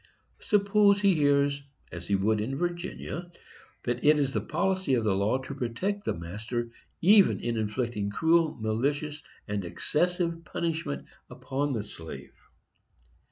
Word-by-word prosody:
Suppose 200 -1 +4
he 200 -2 +5
hears, 145 -2 +2 0.3
as 85 +1 -7
he 100 - +2
would 105 +2 +1
in 130 +6 -2
Virginia, 175 0 -4 0.5
that 120 0 -2
it 150 +1 +6
is 140 -2 0
the - - 0
policy 185 -3 0
of 115 - 0
the 105 -3 +2
law 100 +6 +2
to 130 +1 -7
protect 180 - -3
the - - 0
master 110 +8 -4 0.3
even 200 +2 +6
in 120 -1 -2
inflicting 110 -1 -2
cruel, 160 +7 +2
malicious 145 +7 -1 0.3
and 105 -1 -2
excessive 170 - 0
punishment 160 - -3 0.2
upon 140 +1 -2
the 110 -4 -2
slave. 80 -5 -8
140 Hz, 140 wpm, -28 LUFS, 110-170 Hz, 0.5 s, it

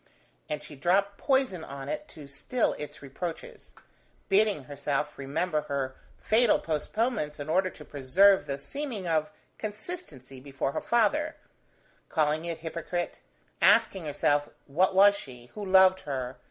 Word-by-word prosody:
And 150 0 -3
she 150 - -10
dropped 195 +7 +1
poison 265 - +1
on 140 -2 -7
it 300 0 -4
to 155 - -12
still 140 - -1
its 150 -1 -7
reproaches: 160 +5 -7 0.6
bidding 200 -5 +3
herself 145 +2 -3
remember 155 +4 -1
her 135 -2 -3 0.2
fatal 225 +1 +4
postponements 160 - -2
in 145 +1 -6
order 185 +3 +2
to 150 - -13
preserve 185 +9 +4
the 140 - -2
seeming 215 - -5
of 160 +1 +1 0.3
consistency 210 - -7
before 135 0 -3
her - - -3
father; 265 +7 +1 0.7
calling 155 0 +1
it 170 -2 -4
hypocrite; 170 +2 -4 0.4
asking 190 -4 +4
herself, 145 0 +1 0.2
what 180 +7 +2
was 200 +1 +7
she! 125 -9 -10
who 210 - -6
loved 190 -1 +6
her! 130 -4 -5
165 Hz, 140 wpm, -28 LUFS, 140-200 Hz, 0.7 s, was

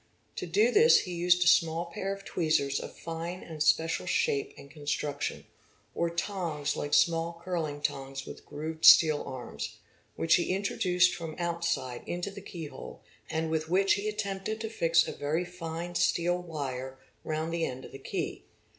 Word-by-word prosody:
To - - -3
do 210 +8 +3
this 465 +3 +6
he 180 - -6
used 175 +1 +3
a - - 0
small 165 0 +4
pair 190 +3 -4
of 195 0 -5
steel - - -12
tweezers 150 -4 +1
of - - -8
fine 165 +2 -5
and 160 -3 -8
special 160 +1 +2
shape 420 -3 +1
and - - -11
construction, 145 -1 -3 0.5
or 170 - 0
tongs 170 -4 -2
like 145 - 0
small 170 0 +2
curling 160 -5 -2
tongs 135 -2 -3
with - - -9
grooved 155 +2 -6
steel 155 -2 +8
arms, 130 -2 -6 0.4
which 165 - +4
he 180 +1 0
introduced 180 -2 +2
from 165 -2 -6
outside 170 -7 -2
into 175 +3 -3
the 200 0 -9
keyhole 170 -6 -8 0.3
and 160 0 -1
with 155 0 -1
which 195 +2 +4
he 205 +1 -1
attempted 210 0 -3
to 220 - -3
fix 170 -5 +3
a - - -3
very 155 +5 -1
fine 175 -1 -6
steel 175 +1 +1
wire 135 -6 -5 0.3
round 160 +1 -2
the 170 -1 0
end 130 -3 -4
of - - -11
the 135 - -9
key. - - -4
170 Hz, 170 wpm, -29 LUFS, 155-180 Hz, 0.5 s, steel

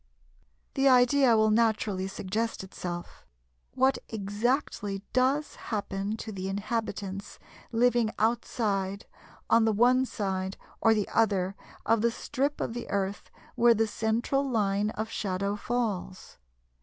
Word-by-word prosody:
] - - -41
The 270 0 +4
idea 250 -1 +5
will 215 0 +4
naturally 215 -4 +1
suggest 205 +3 -3
itself, 175 -2 -7 0.5
what 265 +1 +3
exactly 205 -1 -1
does 270 +4 +1
happen 205 -1 -2
to 220 - -6
the 190 -1 -4
inhabitants 200 -1 -4 0.3
living 240 -1 +3
outside 210 -3 0 0.4
(on 230 0 +4
the 220 - +3
one 250 +4 +4
side 190 -3 -3 0.2
or 225 -1 +5
the 210 -2 0
other) 195 -4 +1 0.3
of 225 -1 +3
the 235 - +3
strip 280 +4 -2
of - - -2
the 240 0 -6
Earth 200 0 -2 0.2
where 235 0 +5
the 225 +1 +2
central 225 +5 0
line 205 -3 +1
of 220 0 -4
shadow 200 0 -1
falls? 210 - -3
220 Hz, 130 wpm, -28 LUFS, 195-240 Hz, 0.5 s, idea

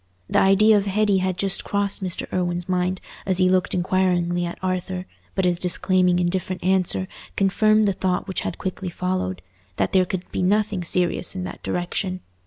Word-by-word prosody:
The - - +2
idea 205 +3 +5
of 200 0 -1
Hetty 205 0 +2
had 185 -1 -1
just 195 0 +1
crossed 200 -1 -1
Mr. 180 -2 -2
Irwine's 175 -1 -1
mind 180 0 0 0.2
as 190 -2 +1
he 185 -1 +4
looked 185 0 +1
inquiringly 175 -1 +1
at 170 - -6
Arthur, 185 0 -2 0.3
but 190 -1 +1
his 175 -1 +1
disclaiming 180 0 +2
indifferent 180 +1 -1
answer 185 0 +1 0.3
confirmed 215 +2 +3
the 200 - +2
thought 185 0 -1
which 190 - -2
had - - -4
quickly 185 0 -4
followed—that 95 - -3
there 185 -1 +4
could 180 0 -3
be - - -2
nothing 200 0 +1
serious 175 +1 0
in 185 - -3
that - - -7
direction. 180 +1 -2
185 Hz, 175 wpm, -23 LUFS, 180-190 Hz, 0.3 s, idea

